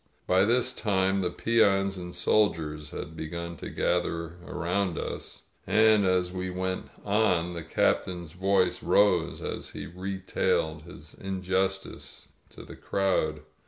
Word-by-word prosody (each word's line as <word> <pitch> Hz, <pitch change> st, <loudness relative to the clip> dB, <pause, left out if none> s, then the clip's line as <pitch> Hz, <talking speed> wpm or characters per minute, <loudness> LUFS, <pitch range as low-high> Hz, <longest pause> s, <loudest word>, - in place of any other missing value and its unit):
By 95 Hz, +2 st, +4 dB
this 125 Hz, +3 st, +2 dB
time 95 Hz, -4 st, +1 dB
the 90 Hz, -2 st, 0 dB
peons 100 Hz, -1 st, +2 dB
and 90 Hz, -1 st, -7 dB
soldiers 80 Hz, -6 st, +1 dB
had 80 Hz, -, -7 dB
begun 85 Hz, +2 st, -5 dB
to -, -, -7 dB
gather 85 Hz, -1 st, -1 dB
around 90 Hz, +1 st, -1 dB
us, -, -, -6 dB, 0.2 s
and 110 Hz, -3 st, +5 dB
as 90 Hz, -1 st, +2 dB
we 95 Hz, 0 st, -3 dB
went 95 Hz, 0 st, -3 dB, 0.2 s
on 95 Hz, -5 st, +2 dB
the 85 Hz, -, -5 dB
Captain's 85 Hz, +1 st, 0 dB
voice 90 Hz, 0 st, +1 dB
rose 90 Hz, -5 st, +3 dB
as -, -, -4 dB
he -, -, -7 dB
retailed 90 Hz, -4 st, -1 dB
his 75 Hz, -3 st, -12 dB
injustice 95 Hz, 0 st, -3 dB, 0.2 s
to -, -, -12 dB
the -, -, -11 dB
crowd. 80 Hz, -6 st, 0 dB
90 Hz, 130 wpm, -28 LUFS, 85-95 Hz, 0.2 s, and